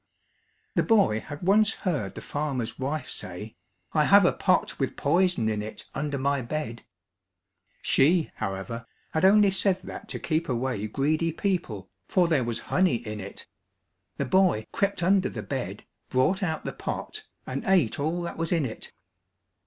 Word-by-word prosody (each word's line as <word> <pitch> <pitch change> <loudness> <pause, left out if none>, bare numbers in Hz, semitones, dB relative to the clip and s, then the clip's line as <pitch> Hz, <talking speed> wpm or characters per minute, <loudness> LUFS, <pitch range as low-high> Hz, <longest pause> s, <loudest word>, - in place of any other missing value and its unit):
The - - +3
boy 200 - +3
had 145 +7 -9
once 210 +3 +4
heard 140 - -2
the - - -6
farmer's 135 -6 -3
wife 145 +4 -2
say, 100 +5 -6 0.4
"I 150 -1 +3
have 200 +2 +7
a - - +4
pot 185 -2 +1
with 135 - -1
poison 175 -5 +2
in 105 -1 0
it 110 +1 -8
under 145 0 -2
my 140 0 +1
bed." 120 -2 -4 1.0
She, 160 +4 +3
however, 105 +5 -4 0.2
had 160 +3 +2
only 205 0 +6
said 190 0 +2
that - - -8
to - - -4
keep 160 0 -1
away 120 -4 -1
greedy 155 +8 0
people, 155 - -2 0.2
for 180 -2 +3
there 155 -6 +2
was 115 -1 -2
honey 185 -8 +2
in 110 -2 -5
it. 100 0 -8 0.7
The - - -1
boy 185 - +3
crept 200 -3 0
under 190 +2 +3
the - - -6
bed, 115 -7 -4 0.3
brought 130 +10 +2
out 160 -5 -2
the - - -3
pot, 430 0 -5 0.2
and - - -4
ate 180 - +3
all 165 +4 -1
that 170 - -5
was 165 0 -2
in 165 -5 +2
it. 110 - -6
150 Hz, 165 wpm, -27 LUFS, 115-185 Hz, 1.0 s, have